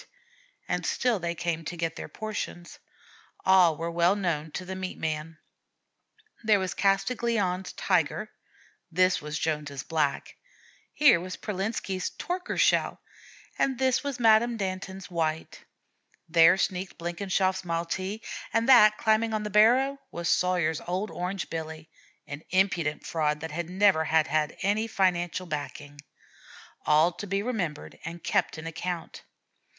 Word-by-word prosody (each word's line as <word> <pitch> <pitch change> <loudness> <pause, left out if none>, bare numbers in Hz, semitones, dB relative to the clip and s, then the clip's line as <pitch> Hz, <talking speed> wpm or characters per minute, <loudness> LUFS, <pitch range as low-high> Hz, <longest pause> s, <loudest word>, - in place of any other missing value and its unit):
And - - -1
still 245 -5 +1
they 170 0 -3
came 165 -1 -2
to 175 +3 -5
get 165 0 -2
their - - -7
portions. 205 -5 -6 0.7
All 180 -4 +5
were 165 +1 -3
well 170 +3 +3
known 165 -6 -2
to 185 - -5
the 190 +1 -5
meat 185 0 -5
man. 155 0 -4 1.1
There 215 -1 +4
was 185 -2 -2
Castiglione's 195 -2 0
Tiger; 185 +4 0 0.6
this 185 +1 +3
was 150 +1 -4
Jones's 150 -3 -2
Black; 155 -4 -1 0.5
here 290 - +5
was 185 +2 -6
Pralitsky's 195 -2 -3
"Torkershell," 360 +1 +1 0.6
and 265 -2 +1
this 260 +1 +1
was 280 -3 -4
Madame 230 +1 +4
Danton's 190 -1 -5
White; 160 -2 -3 0.6
there 165 +3 +6
sneaked 185 -1 -2
Blenkinshoff's 185 +2 -1
Maltee, 185 +5 -3 0.3
and 230 +1 +1
that 215 -5 +7
climbing 220 0 +2
on 215 - -2
the 210 - -4
barrow 255 +7 +4
was 170 0 -4
Sawyer's 175 -4 +1
old 185 +4 -2
Orange 180 +1 -3
Billy, 160 -1 -6 0.3
an 145 +1 -7
impudent 170 -5 +1
fraud 150 -2 0
that 160 -1 -6
never 185 -3 +3
had 160 0 +3
had 155 -1 -1
any 210 +3 +1
financial 185 -3 0
backing, 145 -2 -6 0.9
all 155 +3 +5
to 205 +4 -8
be 195 +1 -1
remembered 195 -11 -4
and 170 0 -7
kept - - 0
in 155 - -8
account. 170 +1 -5
180 Hz, 135 wpm, -27 LUFS, 165-205 Hz, 1.1 s, that